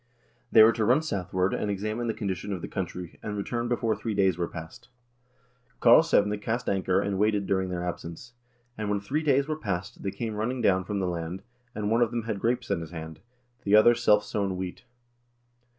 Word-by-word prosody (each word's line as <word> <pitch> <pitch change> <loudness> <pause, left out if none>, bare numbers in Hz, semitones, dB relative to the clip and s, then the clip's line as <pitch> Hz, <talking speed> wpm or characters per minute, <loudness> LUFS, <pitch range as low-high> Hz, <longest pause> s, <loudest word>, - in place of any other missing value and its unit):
They 110 - +9
were 110 - +7
to 115 - -1
run 125 +8 +3
southward, 95 - -1
and 105 - -2
examine 110 +4 -2
the 110 - -1
condition 100 -1 -3
of 90 -3 -4
the - - -3
country, 90 -2 -5
and 105 -1 -4
return 120 +4 -2
before 115 -2 0
three 110 +1 -4
days 95 -2 +3
were 85 -1 -2
past. 80 +5 -10 0.9
Karlsevne 115 -6 +5
cast 115 +3 -2
anchor 95 -1 +1
and 100 -1 -1
waited 105 -1 +2
during 95 -1 0
their 90 -1 -3
absence; 90 +6 -7 0.2
" 120 0 -40
and 105 -1 -2
when 105 -1 +1
three 135 +10 -2
days 140 -2 +2
were 155 0 -3
past, 95 - -4
they 100 - -2
came 110 +3 -4
running 115 +5 -2
down 95 -5 +2
from 100 +1 -3
the 95 -2 0
land, 85 +1 -4 0.3
and 105 0 -2
one 115 +1 +3
of 120 - +3
them 120 -1 -3
had 110 -3 -3
grapes 120 +4 -1
in - - 0
his 80 - -7
hand, 80 -2 -8 0.4
the 100 +1 +4
other 110 +3 +7
self 105 -3 +3
sown 100 -3 -2
wheat. 90 +5 -6
105 Hz, 210 wpm, -27 LUFS, 95-115 Hz, 0.9 s, They